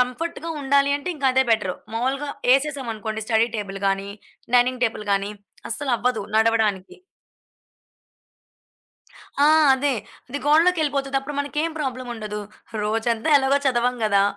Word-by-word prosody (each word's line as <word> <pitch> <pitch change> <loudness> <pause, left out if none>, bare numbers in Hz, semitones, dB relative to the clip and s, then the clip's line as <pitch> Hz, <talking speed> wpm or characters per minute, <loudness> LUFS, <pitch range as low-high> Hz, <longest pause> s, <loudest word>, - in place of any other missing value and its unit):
కంఫర్ట్‌గా 320 +6 -2
ఉండాలి 280 +1 +3
అంటే, 325 - -7
ఇంకా 280 - -1
అదే 265 0 +3
బెటరు. 200 -5 +1 0.2
మామూలుగా 270 +5 -1 0.3
ఏసేసాం 275 -2 -1
అనుకోండి, 220 +1 -5
స్టడీ 225 0 +2
టేబుల్ 195 -1 -5
గానీ, 195 +1 -1 0.5
డైనింగ్ 250 +1 +2
టేబుల్ 215 -2 -3
గానీ 200 +1 0 0.4
అస్సలవ్వదు 245 -3 -1
నడవడానికి. 220 -4 +1 2.5
ఆ! - - +6 0.3
అదే 280 +1 0 0.4
అది 285 - -4
గోడలోకెళ్ళిపోతది 295 -4 +2
అప్పుడు 275 +2 -7
మనకేం 300 +3 -1
ప్రాబ్లముండదు. 240 -6 -4 0.4
రోజంతా 225 +5 -1
ఎలాగో 275 +1 +3
చదవం 250 -1 +2
గదా, 200 -2 +3
250 Hz, 115 wpm, -23 LUFS, 220-280 Hz, 2.5 s, ఆ